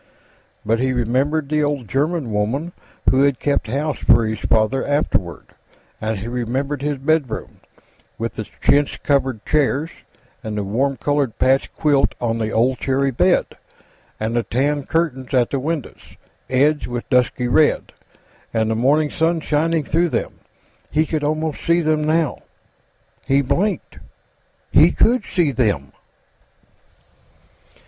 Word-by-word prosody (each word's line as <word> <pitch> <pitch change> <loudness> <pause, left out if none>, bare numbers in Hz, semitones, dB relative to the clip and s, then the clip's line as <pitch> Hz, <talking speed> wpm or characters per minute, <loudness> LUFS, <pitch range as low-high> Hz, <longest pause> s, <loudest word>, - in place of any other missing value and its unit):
But 115 +2 +1
he 130 +1 +1
remembered 135 +6 0
the 150 +1 +1
old 145 -5 -2
German 145 - -1
woman 115 +11 -1 0.4
who 130 - +3
had 140 -2 +3
kept 145 -3 0
house 140 +5 -2
for 115 -1 +4
his 110 -1 -3
father, 110 +5 +1
afterward, 95 - -1 0.5
and 110 0 -2
he 105 +4 -6
remembered 130 +4 -2
his 145 0 -1
bedroom, 140 -2 -1 0.6
with 115 0 -4
its 110 - -5
chintz 145 0 +3
covered 135 -6 0
chairs, 150 +1 +1 0.5
and 110 -1 -4
the 105 - -1
warm 130 +7 -1
colored 145 -5 -1
patch 135 +1 +2
quilt 145 -3 +2
on 115 -1 -1
the 110 -1 -1
old 125 +3 +1
cherry 135 0 0
bed, 120 - +3 0.7
and 110 +2 -2
the 120 - +2
tan 140 +4 -1
curtains 135 -6 -1
at 120 -2 +2
the 140 - 0
windows, 150 0 -5 0.3
edged 145 +4 +2
with 120 -1 -5
dusky 125 -1 +2
red, 150 +5 +2 0.6
and 110 -1 0
the - - 0
morning 145 +6 +2
sun 165 0 +1
shining 160 +1 0
through 170 +4 +1
them. - - -3 0.5
He 155 +2 +2
could 155 -1 -2
almost 155 0 -2
see 170 +1 +3
them, 155 -1 +1
now. 155 0 +1 0.9
He 140 +1 +3
blinked. 200 +10 -1 0.7
He - - +6
could 240 -1 +2
see 170 -6 +1
them! 105 - 0
135 Hz, 140 wpm, -20 LUFS, 120-150 Hz, 0.9 s, He